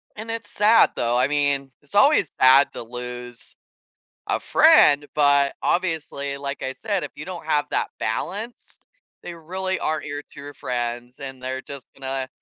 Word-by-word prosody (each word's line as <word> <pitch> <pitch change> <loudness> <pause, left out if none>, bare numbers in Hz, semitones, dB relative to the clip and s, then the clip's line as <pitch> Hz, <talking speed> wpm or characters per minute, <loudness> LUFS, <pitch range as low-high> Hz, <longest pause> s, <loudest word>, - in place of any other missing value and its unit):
And 220 +2 -8
it's 230 -1 -5
sad, 215 +3 +5
though. 120 +1 +1
I 125 - +3
mean, 140 -2 0
it's 145 +7 -10
always 240 - +4
sad 130 +2 +6
to - - -6
lose 125 0 -6 0.7
a - - 0
friend, 145 0 +5
but, 140 -1 +4
obviously, 160 -5 -1
like 140 0 -5
I 130 - -3
said, 200 +4 -3
if - - -6
you 155 - -8
don't 175 -4 -8
have 150 -2 +1
that - - -1
balance, 205 - -4 0.4
they 175 - -7
really 185 +3 -3
aren't 155 -1 -2
your 145 0 -5
true 145 +1 -9
friends, 120 0 -4
and 135 -2 -7
they're 130 +1 -3
just 140 -2 -8
gonna 135 -1 -3
140 Hz, 165 wpm, -23 LUFS, 130-170 Hz, 0.7 s, sad